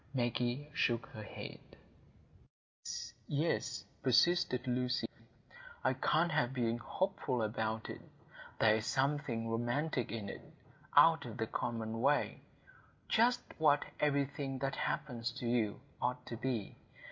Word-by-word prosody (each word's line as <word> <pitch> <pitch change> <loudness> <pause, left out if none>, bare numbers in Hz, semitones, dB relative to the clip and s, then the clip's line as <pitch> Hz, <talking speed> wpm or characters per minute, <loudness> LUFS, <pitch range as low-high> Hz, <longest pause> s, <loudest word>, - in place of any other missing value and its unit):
Maggie 120 +3 0
shook 120 -4 +1
her 110 - -8
head. 105 - -7 1.1
"Yes, - - -6
yes," 150 +3 0 0.2
persisted 130 0 +3
Lucy; 125 0 0 0.8
"I - - +3
can't 165 +2 +2
help 130 -5 +1
being 120 -2 0
hopeful 135 - -1
about 110 +1 -1
it. - - -7 0.6
There 110 - +5
is 110 - -4
something 135 -4 0
romantic 120 +3 0
in 110 -3 -4
it,—out - - +2
of - - -7
the - - 0
common 115 -1 -3
way,—just 225 - 0 0.2
what 145 -2 +4
everything 140 -2 0
that 135 +1 -1
happens 125 -5 -2
to 120 - -6
you 115 -3 +1 0.2
ought 125 0 -1
to 115 - -5
be. 115 -3 -3
125 Hz, 120 wpm, -35 LUFS, 115-145 Hz, 1.1 s, There